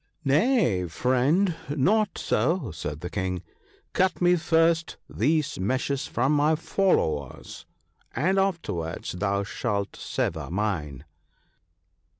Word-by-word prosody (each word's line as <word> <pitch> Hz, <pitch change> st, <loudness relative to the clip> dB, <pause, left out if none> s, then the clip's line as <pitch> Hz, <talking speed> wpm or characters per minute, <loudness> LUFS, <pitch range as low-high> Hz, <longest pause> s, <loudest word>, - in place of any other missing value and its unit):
' -, -, -35 dB
Nay! 140 Hz, -, +2 dB
friend, 130 Hz, -, +2 dB
not 195 Hz, +9 st, +2 dB
so,' 180 Hz, +3 st, 0 dB
said 75 Hz, -1 st, -6 dB
the 90 Hz, -, -5 dB
King, 95 Hz, -2 st, -2 dB, 0.2 s
' -, -, -34 dB
cut 185 Hz, +1 st, +1 dB
me 175 Hz, 0 st, +4 dB
first 165 Hz, 0 st, +2 dB
these 145 Hz, -, 0 dB
meshes 130 Hz, +7 st, -1 dB
from 130 Hz, +4 st, 0 dB
my 150 Hz, +1 st, +3 dB
followers, 150 Hz, -, -1 dB, 0.5 s
and 185 Hz, +9 st, +2 dB
afterwards 165 Hz, -, -2 dB
thou 100 Hz, +2 st, -1 dB
shalt 100 Hz, -1 st, -3 dB
sever -, -, -3 dB
mine.' 85 Hz, -8 st, -2 dB
135 Hz, 115 wpm, -26 LUFS, -, 0.5 s, me